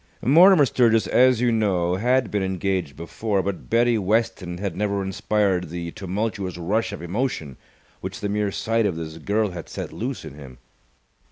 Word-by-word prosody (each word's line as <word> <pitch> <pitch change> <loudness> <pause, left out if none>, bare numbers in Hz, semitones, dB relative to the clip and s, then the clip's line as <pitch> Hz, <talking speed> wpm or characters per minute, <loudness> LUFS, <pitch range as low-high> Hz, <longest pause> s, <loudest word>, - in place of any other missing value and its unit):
Mortimer 165 - +7
Sturgis, 115 -4 +3
as 125 -2 +4
you 120 -1 +3
know, 95 -6 +1
had 125 +1 +1
been 105 - 0
engaged 95 -5 -2
before, 100 +4 -2
but 100 -1 -5
Betty 120 0 +3
Weston 105 -3 -1
had 100 -2 -4
never 100 0 -1
inspired 95 -2 0
the 85 0 -5
tumultuous 95 -1 -3
rush 105 +7 -1
of 100 -4 -7
emotion 85 - -3 0.4
which - - -6
the 105 - -2
mere 105 0 -1
sight 115 +1 0
of 95 - -2
this 80 0 -7
girl 105 +4 0
had 85 -2 -8
set - - -6
loose - - -4
in - - -9
him. 70 -4 -12
100 Hz, 170 wpm, -23 LUFS, 90-115 Hz, 0.4 s, Mortimer